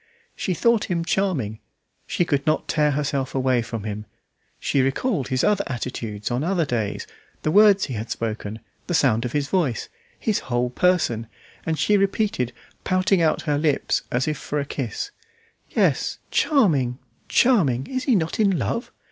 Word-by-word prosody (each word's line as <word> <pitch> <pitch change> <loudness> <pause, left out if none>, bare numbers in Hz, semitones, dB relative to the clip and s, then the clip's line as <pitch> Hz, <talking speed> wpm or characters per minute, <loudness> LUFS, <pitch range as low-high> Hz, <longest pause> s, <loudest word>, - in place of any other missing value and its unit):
She 185 - -2
thought 235 +4 +3
him 170 -4 -1
charming; 155 - 0 0.5
she 175 - +1
could 145 -1 -1
not 155 - +1
tear 150 -1 +2
herself 140 -2 -1
away 130 -2 +2
from 115 -2 -5
him; 105 0 -5 0.5
she 140 - +1
recalled 135 - 0
his 130 -1 0
other 205 -1 +3
attitudes 115 -4 -4
on 125 +4 0
other 175 -1 +1
days, 115 -6 -2 0.4
the 155 - +1
words 205 0 +6
he 135 - -5
had 110 0 -4
spoken, 110 -1 -4 0.3
the 175 - 0
sound 120 -6 +3
of 125 - -4
his 145 -2 0
voice, 145 - 0 0.3
his 215 -3 0
whole 120 0 0
person; 125 -9 +1 0.4
and 160 -1 0
she 205 +8 +3
repeated, 195 - 0 0.3
pouting 185 0 +2
out 160 -2 +2
her 145 -2 0
lips 150 -2 +1
as 125 +4 0
if 155 -1 -1
for 150 - -3
a 140 - -2
kiss 140 - -4 0.6
"Yes, - - +1
charming! 150 - +2 0.3
charming! 165 - +3
Is 260 -1 -3
he 255 - +4
not 165 -1 -1
in 200 -4 +3
love?" 230 +8 -2
145 Hz, 165 wpm, -23 LUFS, 125-190 Hz, 0.6 s, words